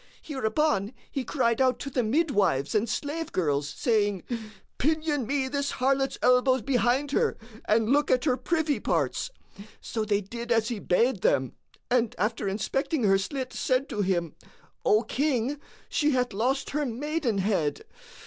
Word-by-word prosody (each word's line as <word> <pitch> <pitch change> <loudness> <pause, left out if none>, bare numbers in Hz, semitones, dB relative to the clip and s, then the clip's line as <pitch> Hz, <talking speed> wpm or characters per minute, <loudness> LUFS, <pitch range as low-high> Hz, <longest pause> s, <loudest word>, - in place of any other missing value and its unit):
Hereupon 265 -5 0 0.2
he 270 - -2
cried 240 -4 +1
out 255 -2 +3
to 275 - -5
the 250 - +1
midwives 215 - +1
and 215 +1 +1
slave 305 +8 -3
girls, 145 -4 0
saying,:—Pinion 230 - -1
me 275 0 0
this 280 +1 -2
harlot's 270 +1 +1
elbows 250 -1 +4
behind 260 +2 +1
her 450 +9 +1 0.3
and 220 0 +2
look 290 +3 +3
at 255 +2 +2
her 260 -5 +3
privy 315 +1 0
parts. - - 0 0.5
So 220 - -3
they 205 -1 +1
did 235 +4 -7
as 225 -1 +2
he 235 -4 -3
bade 210 +3 +1
them 130 -2 +2 0.4
and 240 -3 +2
after 210 +1 -1
inspecting 240 +8 -1
her 195 -2 +4
slit 255 +5 -4
said 260 +2 0
to 210 - -2
him,:—O 180 +4 -1
King, 270 +2 0 0.3
she 300 -1 +1
hath 250 -3 0
lost 255 +7 0
her 300 +1 0
maidenhead. 230 - -1
245 Hz, 145 wpm, -27 LUFS, 210-275 Hz, 0.5 s, elbows